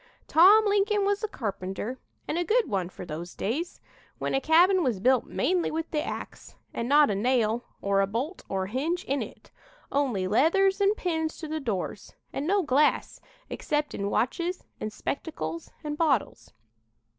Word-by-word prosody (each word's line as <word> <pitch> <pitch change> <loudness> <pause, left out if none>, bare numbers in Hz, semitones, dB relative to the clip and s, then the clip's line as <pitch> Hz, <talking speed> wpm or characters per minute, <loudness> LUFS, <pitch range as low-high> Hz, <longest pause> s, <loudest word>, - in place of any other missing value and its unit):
"Tom 395 +7 +7
Lincoln 410 0 +2
was 405 +2 0
a - - +1
carpenter, 205 - -4 0.3
and - - -2
a - - +1
good 460 +7 +2
one 190 -4 -1
for 185 - -9
those 170 +2 -7
days, 295 - -3 0.4
when - - -2
a 270 - +1
cabin 355 +5 +5
was 245 - 0
built 255 +3 +3
mainly 360 -1 0
with 325 +1 -4
the 300 - 0
ax, - - -7 0.2
and 235 +1 -3
not 290 -3 +6
a - - 0
nail 235 +1 +1 0.2
or 200 0 +2
a 195 - +1
bolt 250 - -4
or 190 -1 -1
hinge 295 - -2
in 275 +1 -1
it, - - -9 0.4
only 255 -10 0
leathers 385 - +3
and 400 +2 +3
pins 320 -3 -2
to 315 - -6
the 315 +1 -3
doors, 205 -5 -4 0.2
and 280 +3 -3
no 395 +1 +2
glass, 295 0 +1 0.3
except 295 0 -2
in 200 0 -2
watches 340 - -1 0.2
and 215 - -4
spectacles 165 - -5
and 295 0 -4
bottles. 290 -9 0
290 Hz, 170 wpm, -27 LUFS, 215-350 Hz, 0.4 s, Tom